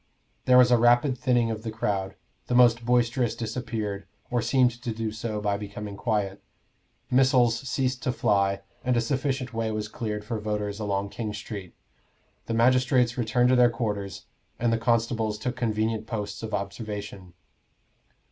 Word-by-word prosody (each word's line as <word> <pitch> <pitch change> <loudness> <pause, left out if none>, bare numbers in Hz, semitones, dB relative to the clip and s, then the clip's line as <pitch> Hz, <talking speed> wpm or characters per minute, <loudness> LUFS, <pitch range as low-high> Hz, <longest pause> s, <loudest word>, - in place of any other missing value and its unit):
There 125 0 +6
was 125 -1 +6
a 120 - +5
rapid 120 +3 +4
thinning 120 -3 +1
of 110 -1 -4
the 110 - -4
crowd: 100 -3 -2 0.3
the 125 - 0
most 120 -1 +5
boisterous 120 0 +1
disappeared, 110 -3 -4 0.2
or 120 -1 +1
seemed 125 -1 +2
to 125 -3 -3
do 110 -1 -2
so 110 0 -4
by 105 -1 0
becoming 105 0 -7
quiet; 105 -3 -1 0.7
missiles 125 -3 +4
ceased 130 -3 -1
to 125 - 0
fly, 100 -4 +1 0.2
and 125 -1 +1
a - - +4
sufficient 130 +1 -2
way 115 -1 -1
was 110 -1 -3
cleared 105 -1 -4
for 110 0 -3
voters 105 -1 -3
along 100 -1 -1
King 105 -1 -5
Street. 105 -4 -7 0.7
The 115 - -1
magistrates 125 0 +3
returned 120 +1 +2
to 130 - +5
their 125 -1 +6
quarters, 105 -5 -4 0.3
and 120 -1 +2
the 115 - +1
constables 115 -2 +1
took 125 +3 -3
convenient 110 -2 -1
posts 105 -4 -4
of 110 -1 -5
observation. 100 -2 -6
115 Hz, 160 wpm, -26 LUFS, 105-125 Hz, 0.7 s, There